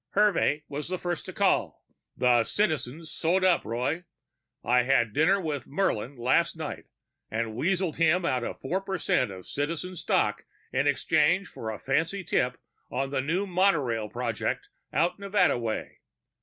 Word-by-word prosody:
Hervey 195 Hz, -7 st, +3 dB
was 145 Hz, +1 st, -5 dB
the 185 Hz, -, -1 dB
first 175 Hz, -2 st, -3 dB
to -, -, -6 dB
call. -, -, +1 dB, 0.3 s
"The 120 Hz, -2 st, +4 dB
Citizen's 160 Hz, -, -1 dB
sewed 180 Hz, +3 st, +1 dB
up, 185 Hz, -2 st, +4 dB
Roy! 125 Hz, +10 st, -2 dB, 0.6 s
I 125 Hz, +1 st, +4 dB
had 120 Hz, -4 st, +2 dB
dinner 170 Hz, +7 st, +4 dB
with 155 Hz, -6 st, -3 dB
Murlin 140 Hz, -, -1 dB
last 130 Hz, +8 st, +2 dB
night 155 Hz, -2 st, -5 dB, 0.4 s
and 110 Hz, +1 st, -2 dB
weaseled 175 Hz, +5 st, 0 dB
him 165 Hz, +2 st, +3 dB
out 125 Hz, -5 st, +1 dB
of -, -, -5 dB
four 180 Hz, +9 st, -1 dB
percent 190 Hz, -, 0 dB
of 95 Hz, -2 st, -9 dB
Citizen 165 Hz, +5 st, -3 dB
stock 165 Hz, -, 0 dB, 0.3 s
in -, -, +2 dB
exchange 175 Hz, +5 st, +2 dB
for 110 Hz, -, -6 dB
a 110 Hz, -, -4 dB
fancy 165 Hz, +8 st, -1 dB
tip 125 Hz, -6 st, 0 dB, 0.3 s
on 135 Hz, +2 st, -2 dB
the 135 Hz, -, 0 dB
new 170 Hz, +8 st, 0 dB
monorail 150 Hz, -, +1 dB
project 120 Hz, -1 st, -2 dB, 0.2 s
out 175 Hz, +4 st, +1 dB
Nevada 200 Hz, -9 st, +2 dB
way. 115 Hz, -2 st, -4 dB
150 Hz, 155 wpm, -28 LUFS, 125-180 Hz, 0.6 s, The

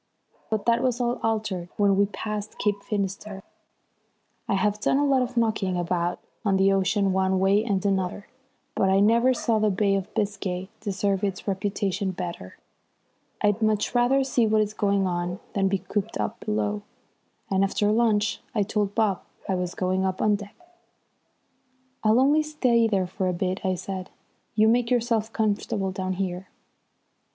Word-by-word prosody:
But 220 Hz, -2 st, -1 dB
that 235 Hz, 0 st, +3 dB
was 250 Hz, -2 st, 0 dB
all 240 Hz, 0 st, 0 dB
altered 215 Hz, -6 st, -2 dB
when 200 Hz, -1 st, +4 dB
we 200 Hz, +1 st, +3 dB
passed 210 Hz, 0 st, -5 dB
Cape 205 Hz, -1 st, 0 dB
Finisterre. 200 Hz, -1 st, -4 dB, 1.0 s
I -, -, +1 dB
have 210 Hz, +2 st, +1 dB
done 265 Hz, -, +2 dB
a 290 Hz, -, +2 dB
lot 270 Hz, -2 st, +3 dB
of 250 Hz, 0 st, -3 dB
knocking 215 Hz, -5 st, +1 dB
about 175 Hz, 0 st, -1 dB, 0.3 s
on 195 Hz, -3 st, +2 dB
the 195 Hz, +1 st, +4 dB
ocean 195 Hz, 0 st, +2 dB
one 190 Hz, 0 st, +2 dB
way 195 Hz, +3 st, +3 dB
and 200 Hz, -4 st, -1 dB
another, 190 Hz, 0 st, -1 dB, 0.5 s
but 190 Hz, -, +2 dB
I 190 Hz, +1 st, +4 dB
never 230 Hz, +5 st, +4 dB
saw 230 Hz, -3 st, +1 dB
the 215 Hz, 0 st, +3 dB
Bay 200 Hz, +1 st, +1 dB
of 195 Hz, +1 st, -2 dB
Biscay 195 Hz, -2 st, -2 dB
deserve 200 Hz, -1 st, -1 dB
its 195 Hz, 0 st, -2 dB
reputation 195 Hz, 0 st, -1 dB
better. 170 Hz, -, -6 dB, 0.9 s
I'd 205 Hz, +1 st, +2 dB
much 215 Hz, 0 st, +1 dB
rather 250 Hz, +3 st, +3 dB
see 250 Hz, -3 st, +2 dB
what 215 Hz, 0 st, +3 dB
is 210 Hz, 0 st, -1 dB
going 200 Hz, -2 st, +1 dB
on 175 Hz, 0 st, -2 dB
than 195 Hz, -1 st, +2 dB
be 195 Hz, +1 st, +1 dB
cooped 190 Hz, -, -3 dB
up 105 Hz, -, -2 dB
below, 105 Hz, -1 st, -1 dB, 0.7 s
and 190 Hz, 0 st, +3 dB
after 205 Hz, +1 st, +1 dB
lunch 215 Hz, -2 st, +2 dB
I 210 Hz, -, +3 dB
told 205 Hz, 0 st, -1 dB
Bob 210 Hz, -5 st, +1 dB, 0.3 s
I 195 Hz, -, 0 dB
was 180 Hz, -1 st, -2 dB
going 185 Hz, 0 st, 0 dB
up 190 Hz, -1 st, -1 dB
on 210 Hz, -1 st, +3 dB
deck. 205 Hz, 0 st, -9 dB, 1.5 s
"I'll 220 Hz, +2 st, +4 dB
only 290 Hz, +4 st, +4 dB
stay 255 Hz, -7 st, +2 dB
there 195 Hz, -4 st, +1 dB
for 185 Hz, +1 st, -3 dB
a 180 Hz, -, 0 dB
bit," 185 Hz, +3 st, -2 dB
I 185 Hz, -1 st, +1 dB
said. 185 Hz, 0 st, -6 dB, 0.5 s
"You 215 Hz, 0 st, +5 dB
make 235 Hz, +1 st, +3 dB
yourself 230 Hz, -3 st, +1 dB
comfortable 205 Hz, -3 st, -1 dB
down 185 Hz, 0 st, -3 dB
here." 185 Hz, 0 st, -3 dB
200 Hz, 170 wpm, -25 LUFS, 190-220 Hz, 1.5 s, You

